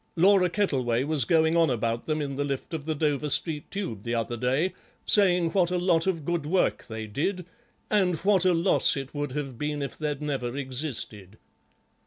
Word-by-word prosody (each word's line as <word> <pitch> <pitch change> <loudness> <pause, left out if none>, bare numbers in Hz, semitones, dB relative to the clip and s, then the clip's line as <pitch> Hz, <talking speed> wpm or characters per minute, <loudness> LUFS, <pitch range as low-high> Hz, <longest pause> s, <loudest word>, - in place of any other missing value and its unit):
Laura 185 +1 +4
Kettleway 130 - 0
was 145 -4 0
going 160 +2 +3
on 165 -2 +4
about 115 -1 -2
them 155 -1 -1
in 140 -1 -4
the 145 - -1
lift 140 +2 -4
of 155 -3 -4
the 160 - -1
Dover 150 -1 0
Street 150 +1 0
Tube 185 - -4
the 115 +2 -3
other 115 +1 -2
day, 130 +10 0 0.3
saying 180 -5 +4
what 180 -1 +2
a 180 - 0
lot 175 -1 +2
of 165 -6 -1
good 170 -1 -1
work 180 +5 0
they 110 -1 -6
did, 165 - -2 0.4
and 190 -4 +2
what 200 -2 +4
a 185 -1 +4
loss 165 -3 +3
it 135 0 -6
would 145 -3 -3
have 135 -4 -5
been 150 -1 -2
if 140 - -6
they'd 150 -2 -2
never 135 -4 -3
existed. 125 - -5
150 Hz, 195 wpm, -26 LUFS, 130-175 Hz, 0.4 s, Laura